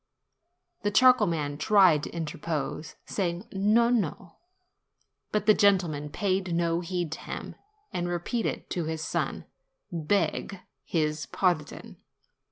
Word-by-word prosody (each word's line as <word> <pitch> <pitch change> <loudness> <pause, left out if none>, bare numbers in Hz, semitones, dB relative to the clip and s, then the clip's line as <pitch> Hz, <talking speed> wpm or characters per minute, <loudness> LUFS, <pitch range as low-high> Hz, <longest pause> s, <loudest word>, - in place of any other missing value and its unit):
The 205 - +1
charcoal 250 0 +5
man 150 -4 -2
tried 185 -3 +5
to - - -5
interpose, 155 -1 -4
saying, 180 0 -2
"No, 215 +5 +3
no!" 185 -6 -2 0.9
but 210 - 0
the 215 - +7
gentleman 175 -8 +2
paid 185 0 -1
no 170 0 +1
heed 175 -2 -3
to 160 - -5
him, - - -6 0.4
and 175 0 -1
re 175 - 0
peated 225 +7 -3
to 175 -3 -2
his 160 0 -3
son, - - -2 0.5
"Beg 175 +3 -1 0.2
his 155 -2 -1
pardon. 175 -6 -1
175 Hz, 125 wpm, -28 LUFS, 160-200 Hz, 0.9 s, the